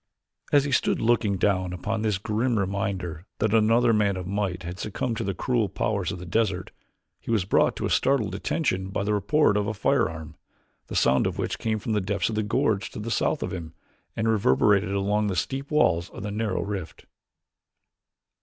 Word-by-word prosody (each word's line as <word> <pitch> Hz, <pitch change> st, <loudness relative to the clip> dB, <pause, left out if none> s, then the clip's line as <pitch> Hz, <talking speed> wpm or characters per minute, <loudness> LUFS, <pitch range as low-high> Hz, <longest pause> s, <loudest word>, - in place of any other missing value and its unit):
As 145 Hz, -1 st, +5 dB
he 145 Hz, -, -3 dB
stood 130 Hz, -, +2 dB
looking 110 Hz, -4 st, +2 dB
down 95 Hz, -2 st, +1 dB
upon 105 Hz, +5 st, -3 dB
this 105 Hz, -3 st, +1 dB
grim 110 Hz, +4 st, 0 dB
reminder 95 Hz, -3 st, -2 dB
that 110 Hz, 0 st, 0 dB
another 115 Hz, +2 st, +4 dB
man 100 Hz, -3 st, +2 dB
of 90 Hz, -, -5 dB
might 95 Hz, -1 st, -2 dB
had 90 Hz, +2 st, -6 dB
succumbed 115 Hz, +3 st, -2 dB
to -, -, -2 dB
the 100 Hz, -1 st, -2 dB
cruel 115 Hz, -3 st, 0 dB
powers 100 Hz, -4 st, -1 dB
of 100 Hz, -, -5 dB
the 90 Hz, -, -8 dB
desert, 95 Hz, 0 st, -1 dB, 0.5 s
he -, -, -12 dB
was 110 Hz, -6 st, +1 dB
brought -, -, +3 dB
to -, -, -2 dB
startled 125 Hz, -8 st, +1 dB
attention 100 Hz, -, -1 dB
by 100 Hz, -, -2 dB
the 105 Hz, +1 st, 0 dB
report 105 Hz, +4 st, +3 dB
of 105 Hz, 0 st, 0 dB
a 110 Hz, -, -2 dB
firearm, 80 Hz, -4 st, 0 dB, 0.5 s
the -, -, -6 dB
sound 65 Hz, -, +3 dB
of -, -, -4 dB
which -, -, -2 dB
came 110 Hz, -1 st, 0 dB
from 110 Hz, +1 st, -3 dB
the 105 Hz, -, +1 dB
depths 100 Hz, +4 st, -1 dB
of -, -, -3 dB
the 110 Hz, -, +1 dB
gorge 110 Hz, -1 st, 0 dB
to -, -, -8 dB
the 115 Hz, +2 st, -4 dB
south 150 Hz, -, 0 dB
of -, -, -4 dB
him, 85 Hz, -3 st, -7 dB, 0.4 s
and 110 Hz, 0 st, -1 dB
reverberated 100 Hz, 0 st, +3 dB
along 100 Hz, +2 st, +1 dB
the 95 Hz, -, -1 dB
steep 135 Hz, -, -2 dB
walls 90 Hz, -, +2 dB
of -, -, -9 dB
the 105 Hz, -, -3 dB
narrow 105 Hz, -2 st, -1 dB
rift. 100 Hz, -5 st, -6 dB
105 Hz, 200 wpm, -26 LUFS, 95-110 Hz, 0.5 s, As